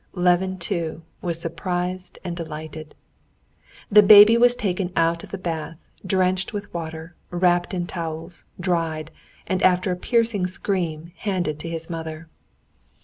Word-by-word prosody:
Levin, 180 +1 +2
too, 165 -2 -3 0.2
was 170 -2 -1
surprised 180 +2 -3
and 175 -2 -4
delighted. 155 -2 -7 1.0
The 210 +1 +9
baby 210 +2 +9
was 245 +1 +5
taken 185 -4 -2
out 165 0 +1
of - - -10
the 195 - -5
bath, 165 -2 -5 0.2
drenched 185 +1 +1
with 205 0 -6
water, 160 0 -6 0.2
wrapped 175 0 +2
in 180 -2 -2
towels, 165 0 -6 0.2
dried, 165 -4 -1 0.3
and 185 -1 -1
after 185 +1 +3
a - - 0
piercing 225 -1 +1
scream, 175 -4 -3
handed 180 -7 -2
to 165 - -6
his 165 -1 -5
mother. 160 -1 -6
175 Hz, 140 wpm, -23 LUFS, 165-185 Hz, 1.0 s, The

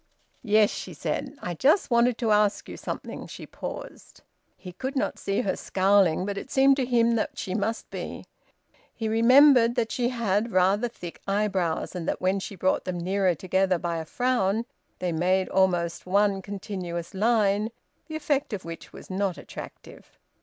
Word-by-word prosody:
"Yes," 215 -2 +4
she - - -7
said. 275 +1 -3
"I 175 - -3
just 280 - +2
wanted 235 0 +3
to 230 -3 0
ask 210 -1 +2
you - - -7
something," - - -6
she - - -9
paused. - - -9 0.3
He 180 - -9
could 265 +9 -5
not 265 - -1
see 195 0 -1
her 195 - -1
scowling, 190 -3 +2
but 200 0 -3
it - - -10
seemed 275 0 +5
to 260 -3 0
him 235 -2 +3
that 215 - -2
she 185 - -4
must 220 +3 -2
be. - - -6 0.7
He 225 - -3
remembered 240 +2 +6
that 235 -3 0
she 245 -1 0
had 230 -2 0
rather 195 +5 +3
thick 180 -7 -10
eyebrows, 195 -5 0
and 180 -2 -5
that - - -1
when 190 +2 +1
she 195 - -7
brought 185 0 0
them 185 -1 -3
nearer 185 0 +1
together 185 +2 +1
by 170 0 -3
a 160 - -4
frown, 230 0 0 0.3
they 180 -1 -2
made 185 +3 +1
almost 175 -3 +1
one 200 +1 +2
continuous 185 -3 -5
line, 210 0 +2 0.4
the 315 - -6
effect 290 -5 -1
of 195 - -5
which 165 0 -8
was - - -11
not 190 -1 -1
attractive. - - -11
200 Hz, 175 wpm, -26 LUFS, 185-235 Hz, 0.7 s, remembered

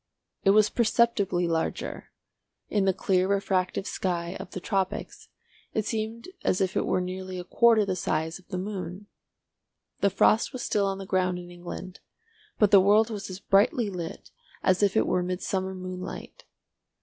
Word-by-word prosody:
It - - +4
was 210 +1 +5
perceptibly 215 -6 +2
larger; 165 -1 -2 0.6
in 205 -2 +1
the 190 - +4
clear 185 0 +1
refractive 195 -1 0
sky 175 -3 -2
of - - -7
the 185 - -6
tropics 190 0 -3 0.5
it 215 - 0
seemed 225 +1 -3 0.2
as 180 - +1
if 190 -1 0
it - - 0
were 185 - +1
nearly 185 0 -5
a 180 - -4
quarter 225 +2 +4
the 190 -2 -1
size 160 -1 -2
of 185 - -22
the 185 - -4
moon. 185 0 -5 0.9
The 200 - +3
frost 215 +6 +3
was 255 - -5
still 200 -2 +1
on 195 0 -2
the 195 - -7
ground 185 -1 +1
in 175 0 -9
England, 175 +1 -8 0.6
but 210 -2 +4
the 195 - +8
world 210 +4 +4
was 205 -2 -5
as 185 0 -7
brightly 205 +2 +2
lit 170 -3 -7 0.3
as 185 +1 +3
if 205 +1 +3
it - - +4
were 180 - +1
midsummer 190 +1 -2
moonlight. 185 0 -7
190 Hz, 170 wpm, -27 LUFS, 180-205 Hz, 0.9 s, the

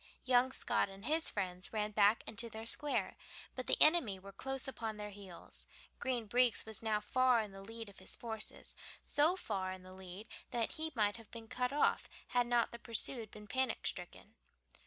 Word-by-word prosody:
Young 255 0 +4
Scott 260 - 0
and 195 +2 -11
his 315 +4 +3
friends 180 0 -2
ran 210 -1 -1
back 210 +1 +4
into 230 +2 +1
their 220 0 -7
square, 290 +5 +3 0.4
but 255 - -5
the - - +3
enemy 305 - +5
were 195 +1 -11
close 270 +7 -1
upon 225 -5 -4
their 210 0 -6
heels. 195 -3 -10 0.3
Green 245 -3 -1
Breeks 245 +2 +3
was 220 -1 -5
now 220 -2 +1
far 255 +3 +3
in 215 -2 -3
the 195 0 -10
lead 225 +2 -8
of 200 - -12
his 185 - -3
forces, 220 -2 -6 0.3
so 310 +5 +4
far 190 - -2
in 185 0 -8
the 185 0 -12
lead 190 +3 -9 0.2
that 235 -2 0
he 320 0 -3
might 210 -1 +2
have 230 -2 -14
been 230 -1 -9
cut 250 +2 -1
off 290 - +2 0.2
had 245 -1 +2
not 240 -1 +2
the 235 - -8
pursued 230 -1 0
been 210 0 -11
panic 260 +3 0
stricken. 190 +3 -5
225 Hz, 195 wpm, -36 LUFS, 205-250 Hz, 0.4 s, enemy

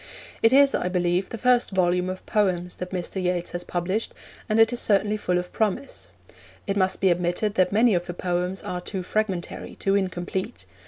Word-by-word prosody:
It 225 - +5
is, 275 +1 +6
I - - 0
believe, 180 +1 0
the 230 - -5
first 250 +1 +3
volume 180 -1 +1
of 185 0 -6
poems 180 -4 0
that 180 - -5
Mr. 185 +1 -3
Yeats 180 -1 -1
has 175 0 -4
published, 185 +6 -2 0.3
and 215 +1 +2
it 225 +2 +5
is 240 - -1
certainly 205 -1 +2
full 180 -4 0
of 180 0 -4
promise. 220 +6 -2 0.6
It 200 - -1
must 185 -1 +1
be 190 - +4
admitted 175 +4 0
that 185 -2 +2
many 220 +2 +4
of 175 -1 -1
the 175 - -5
poems 180 +1 -2
are 180 0 -4
too 185 0 -4
fragmentary, 195 -3 -3
too 195 - 0
incomplete. 190 +2 -2
185 Hz, 195 wpm, -25 LUFS, 180-215 Hz, 0.6 s, is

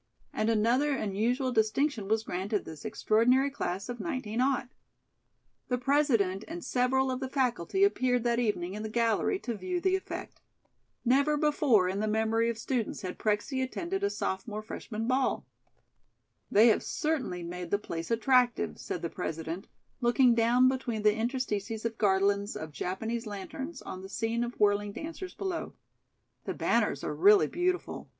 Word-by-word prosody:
And 215 +1 0
another 240 +6 +2
unusual 240 +4 0
distinction 220 0 +1
was 220 +1 +1
granted 195 +2 -2
this 155 -2 -9
extraordinary 250 +6 +3
class 195 -7 -3
of 245 -1 -5
19. 250 -7 -2 1.3
The 250 - 0
President 240 -8 +2
and 335 +1 -6
several 260 +1 +1
of 255 - -2
the 265 -1 -4
faculty 260 - 0
appeared 255 - +2
that 235 0 +1
evening 195 -6 -1
in 210 - -5
the 220 - -4
gallery 230 - +1
to 240 - -3
view 360 - -3
the 375 +1 +2
effect. 380 - -6 0.6
Never 280 +5 +3
before 290 -10 +3
in 190 +2 -2
the 215 - 0
memory 220 +2 +1
of 230 - -3
students 230 -2 -2
had 185 - -5
Prexy 215 +5 0
attended 345 +9 -3
a 405 - +3
sophomore 210 - -3
freshman 220 0 -5
ball. 260 +1 +1 1.0
"They 220 +4 +6
have 220 - +3
certainly 260 - -2
made 175 0 -6
the 205 - +2
place 165 -5 -6
attractive," 245 +1 +2
said 175 - -5
the 170 - -1
President, 165 +1 -4 0.3
looking 245 0 +4
down 235 +2 +4
between 250 -4 -1
the 210 0 +5
interstices 225 -2 -2
of 225 -1 -3
garlands 200 0 +2
of 155 0 -6
Japanese 220 +9 -3
lanterns 265 - -6
on 185 - -7
the 190 - -9
scene 225 +3 -1
of 240 0 -6
whirling 205 0 +2
dancers 330 - -7
below. 375 -4 -4 0.7
"The - - -3
banners - - +1
are - - -2
really 410 +1 +6
beautiful. 365 +1 -2
230 Hz, 155 wpm, -30 LUFS, 205-265 Hz, 1.3 s, They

